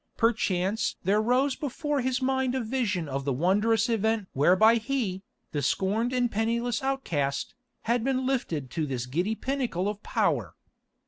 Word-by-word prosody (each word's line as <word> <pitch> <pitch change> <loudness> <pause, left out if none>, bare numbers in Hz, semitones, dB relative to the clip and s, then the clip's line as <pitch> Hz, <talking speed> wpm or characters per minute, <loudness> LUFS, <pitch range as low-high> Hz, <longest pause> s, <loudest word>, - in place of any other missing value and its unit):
Perchance 210 -3 +1
there 200 +4 +3
rose 255 +4 +2
before 295 0 -2
his 260 +1 -1
mind 265 -1 +1
a - - +1
vision 215 - -1
of 135 0 -3
the 140 - -1
wondrous 205 - +2
event 220 -3 0
whereby 185 - +5
he, 225 -6 -2 0.3
the 145 - -1
scorned 210 - 0
and 245 -2 +1
penniless 235 +2 0
outcast, 165 - -1 0.3
had 235 0 +1
been 260 0 0
lifted 170 - -2
to 160 -3 -2
this 125 -3 -3
giddy 175 +12 -1
pinnacle 250 -9 -2
of 210 0 -3
power. - - 0
220 Hz, 150 wpm, -27 LUFS, 185-255 Hz, 0.3 s, whereby